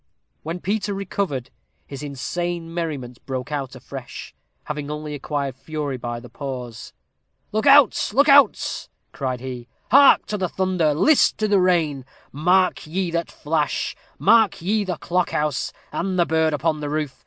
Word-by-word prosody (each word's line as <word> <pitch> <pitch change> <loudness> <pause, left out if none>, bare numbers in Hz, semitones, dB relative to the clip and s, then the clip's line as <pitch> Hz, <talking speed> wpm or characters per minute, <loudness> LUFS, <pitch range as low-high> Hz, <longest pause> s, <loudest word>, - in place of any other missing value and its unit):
When 165 +3 -5
Peter 200 +2 -2
recovered, 185 -9 -3 0.3
his 140 -1 -8
insane 165 +4 -4
merriment 145 -8 -4
broke 130 +1 -4
out 135 -3 -3
afresh, 130 0 -9 0.3
having 150 -1 -5
only 150 0 -5
acquired 140 -2 -3
fury 145 0 -4
by 120 -1 -5
the 125 - -12
pause. 125 -3 -7 0.6
"Look 215 +5 0
out, 275 -3 +6
look 280 +7 +4
out!" 280 -1 +4 0.2
cried 130 -3 -3
he; 125 -2 -7 0.2
"hark 280 +2 +7
to 210 - -3
the 185 -2 -1
thunder 180 -5 +1
list 300 - +4
to 215 - 0
the 200 -2 +3
rain! 165 -7 +1 0.3
Marked 180 +4 +2
ye 180 +2 -2
that 170 0 -2
flash 150 -1 -1 0.2
marked 225 -3 +4
ye 210 +3 +1
the 180 -4 -3
clock 180 +2 0
house 150 -3 -1 0.2
and 185 +1 -2
the 175 - +4
bird 160 -1 +2
upon 155 +1 0
the 145 -1 -4
roof? 150 -3 -3
155 Hz, 155 wpm, -22 LUFS, 140-185 Hz, 0.6 s, hark